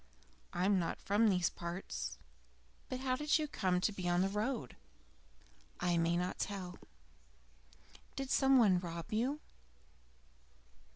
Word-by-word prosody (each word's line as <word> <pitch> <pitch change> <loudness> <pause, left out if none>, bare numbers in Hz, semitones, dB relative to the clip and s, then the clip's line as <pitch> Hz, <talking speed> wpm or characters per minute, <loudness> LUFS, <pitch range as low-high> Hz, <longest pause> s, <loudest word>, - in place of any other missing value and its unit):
"I 180 0 0
am 200 -1 +4
not 170 - -2
from 210 +3 +3
these 180 -3 +2
parts." 170 +2 -5 0.7
"But 255 0 -3
how 255 -1 +1
did 300 +3 +2
you 305 -1 -1
come 185 -9 +1
to 210 - +2
be 185 -3 -3
on 175 +1 +3
the 195 - +1
road?" 210 - -2 1.0
"I 175 -1 +1
may 170 +1 +2
not 180 +1 -2
tell." 185 -3 -4 1.4
"Did 270 -1 -3
some 270 -1 +5
one 200 -7 +5
rob 170 +3 -6
you?" 260 +7 0
195 Hz, 135 wpm, -35 LUFS, 180-255 Hz, 1.4 s, some